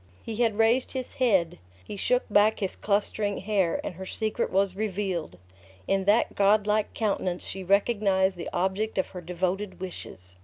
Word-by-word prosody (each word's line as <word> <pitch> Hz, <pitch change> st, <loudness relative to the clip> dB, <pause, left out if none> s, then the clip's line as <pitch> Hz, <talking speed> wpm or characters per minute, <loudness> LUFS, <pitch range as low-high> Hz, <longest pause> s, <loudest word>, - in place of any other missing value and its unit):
He 225 Hz, -2 st, -5 dB
had 230 Hz, -3 st, +1 dB
raised 230 Hz, +3 st, +2 dB
his 260 Hz, -2 st, -4 dB
head; 185 Hz, -8 st, +2 dB, 0.3 s
he -, -, -7 dB
shook 250 Hz, +5 st, +1 dB
back 210 Hz, +1 st, +4 dB
his 195 Hz, -2 st, -2 dB
clustering 205 Hz, 0 st, -1 dB
hair, 195 Hz, -4 st, 0 dB
and -, -, -4 dB
her 190 Hz, +2 st, -8 dB
secret 220 Hz, +3 st, -2 dB
was 195 Hz, 0 st, +1 dB
revealed. 190 Hz, -, -3 dB, 0.5 s
In 195 Hz, -1 st, +1 dB
that 210 Hz, +4 st, +3 dB
god 205 Hz, +1 st, +3 dB
like 210 Hz, 0 st, 0 dB
countenance 190 Hz, -5 st, -1 dB
she 190 Hz, 0 st, -6 dB
recognized 195 Hz, -1 st, +2 dB
the 175 Hz, -, -6 dB
object 190 Hz, +5 st, -1 dB
of 190 Hz, -, 0 dB
her 180 Hz, -, -8 dB
devoted 185 Hz, +3 st, -3 dB
wishes! 90 Hz, -, -9 dB
200 Hz, 165 wpm, -27 LUFS, 185-215 Hz, 0.5 s, back